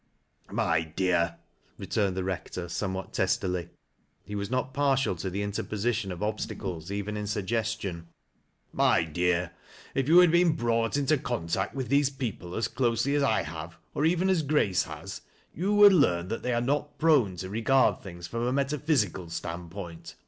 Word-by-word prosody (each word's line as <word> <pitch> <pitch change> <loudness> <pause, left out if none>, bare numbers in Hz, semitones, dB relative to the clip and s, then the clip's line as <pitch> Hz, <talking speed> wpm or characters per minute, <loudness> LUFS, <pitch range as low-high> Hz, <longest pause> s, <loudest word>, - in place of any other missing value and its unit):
" - - -45
My 85 -1 +1
dear," 85 +1 0 0.4
returned 100 -3 -1
the 95 - -1
Rector, 90 -1 -4
somewhat 95 +2 -4
testily 90 -2 0 0.3
— - - -43
he 105 - -8
was 100 -1 -3
not 130 +1 -1
partial 135 -6 +2
to 95 +3 -3
the 100 +3 -2
interposition 105 +1 -2
of 90 +3 -5
obstacles 95 -5 -4
even 100 +1 -3
in 105 0 -3
sug 105 -2 -2
gestion 110 -6 -2 0.2
— - - -43
" - - -43
My - - +4
dear, 85 +2 0 0.4
if 135 -1 0
you 165 +3 +6
had 180 -2 +8
been 170 -1 +4
brought 115 -1 0
into 145 +1 +2
contact 95 -5 -2
with 130 -4 -3
these 140 0 +4
people 115 -10 -5
as 110 - 0
closely 125 +2 0
as 145 - +2
I 125 -6 +2
have, 80 +2 -7 0.2
or 145 - -1
even 175 +3 +2
as 185 -4 +3
Grace 140 - +2
has, - - -8 0.3
you 195 +5 0
would 205 -1 +9
learn 90 - +3
that 115 - -3
they 125 - -1
are 120 - +1
not 145 +4 -1
prone 145 - +3
to 95 +1 -6
regard 115 +5 +3
things 85 -3 -9
from 115 +5 -2
a - - +1
metaphysical 135 - 0
stand 85 +1 -5
point. 85 -3 -8
105 Hz, 185 wpm, -28 LUFS, 90-135 Hz, 0.4 s, would